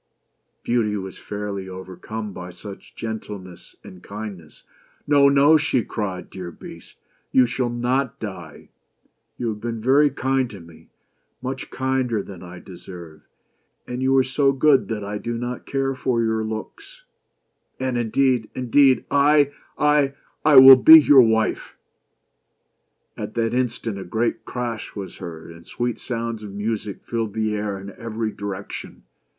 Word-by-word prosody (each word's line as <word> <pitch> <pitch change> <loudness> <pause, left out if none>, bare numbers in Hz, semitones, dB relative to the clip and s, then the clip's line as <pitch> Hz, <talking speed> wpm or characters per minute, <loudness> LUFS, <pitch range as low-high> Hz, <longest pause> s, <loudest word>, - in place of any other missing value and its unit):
Beauty 110 -3 0
was 95 -1 -7
fairly 100 -2 -5
overcome 95 +3 -7
by 90 -1 -8
so 90 +4 -10
much 100 - -12
gentleness 105 -5 -7
and 90 -1 -12
kindness. 100 -6 -9 0.4
"No! 140 -1 +5
no!" 140 +3 +6
she 145 -5 +1
cried, 95 -5 -5
"dear 90 -2 -7
Beast, 85 - -13 0.3
you 130 - +5
shall 125 0 -2
not 125 +2 -1
die. 90 -8 -8 0.7
You 120 - -2
have 105 -1 -5
been 115 -1 -4
very 135 +6 +4
kind 135 -2 0
to 100 - -10
me 85 -1 -16 0.3
— - - -48
much 130 +1 -5
kinder 130 -5 -1
than 95 -4 -11
I 90 0 -10
deserve 85 -3 -11 0.3
— - - -47
and 125 +1 -4
you 135 +1 +3
are 130 - +5
so 135 +2 +2
good 135 -1 +3
that 110 -2 -4
I 105 +1 -4
do 120 +1 -4
not 120 +1 -5
care 135 -1 -1
for 125 -3 0
your 110 -1 0
looks; 110 - -7 0.8
and 130 -1 -1
indeed 120 0 +1
— - - -42
indeed 130 +1 +3
— - - -39
I 145 0 +4
— - - -34
I 150 -2 +3 0.3
will 135 -3 +10
be 160 +5 +10
your 145 -3 +7
wife 110 -2 0 0.7
!" - - -49
At - - -6
that 115 -1 0
instant 120 -4 -2
a - - -6
great 110 +6 -2
crash 120 -3 -5
was 100 -2 -7
heard, 80 -1 -9
and 85 0 -14
sweet 120 +5 -3
sounds 115 -2 -4
of 105 -2 -8
music 105 0 -4
filled 115 -3 -3
the 110 -1 0
air 105 -2 -3
in 100 +1 -9
every 110 0 -4
direction. 100 -1 -7
115 Hz, 160 wpm, -22 LUFS, 100-130 Hz, 0.8 s, will